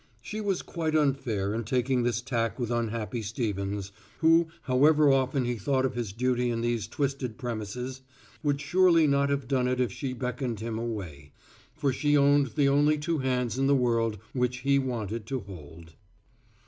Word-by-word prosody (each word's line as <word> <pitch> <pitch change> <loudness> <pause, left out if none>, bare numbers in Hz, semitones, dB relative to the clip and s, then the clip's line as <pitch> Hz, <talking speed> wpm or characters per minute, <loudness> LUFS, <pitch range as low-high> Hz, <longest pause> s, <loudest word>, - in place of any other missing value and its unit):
She 210 - -6
was 195 -3 -1
quite 160 -2 -2
unfair 130 -9 +1
in 115 +1 -2
taking 125 +2 +1
this 120 -1 0
tack 115 -4 -1
with 120 -3 -3
unhappy 115 0 -2
Stevens, 100 -3 -3 0.3
who, 165 0 +4 0.2
however 145 +3 +4
often 130 0 +1
he 120 0 -1
thought 130 +5 +1
of 130 - -1
his 120 -4 -3
duty 125 +2 0
in 115 -1 -1
these 120 -2 -1
twisted 135 -2 -3
premises, 125 +2 -5 0.4
would 145 -2 0
surely 170 +1 +4
not 140 -1 +2
have 140 -2 -1
done 130 -2 +1
it 125 0 0
if 125 -5 +1
she 130 +5 -4
beckoned 125 -2 -3
him 115 0 -4
away. 90 -12 -6 0.4
For 145 -3 0
she 145 +2 +2
owned 140 0 +4
the 145 -2 +3
only 145 +2 +3
two 160 +1 -1
hands 125 -2 -1
in 135 - +2
the 140 - +4
world 115 -4 +1 0.2
which 125 0 -1
he 140 +1 +3
wanted 115 -4 -3
to 130 -1 -2
hold. 80 -4 -12
125 Hz, 175 wpm, -28 LUFS, 115-140 Hz, 0.4 s, who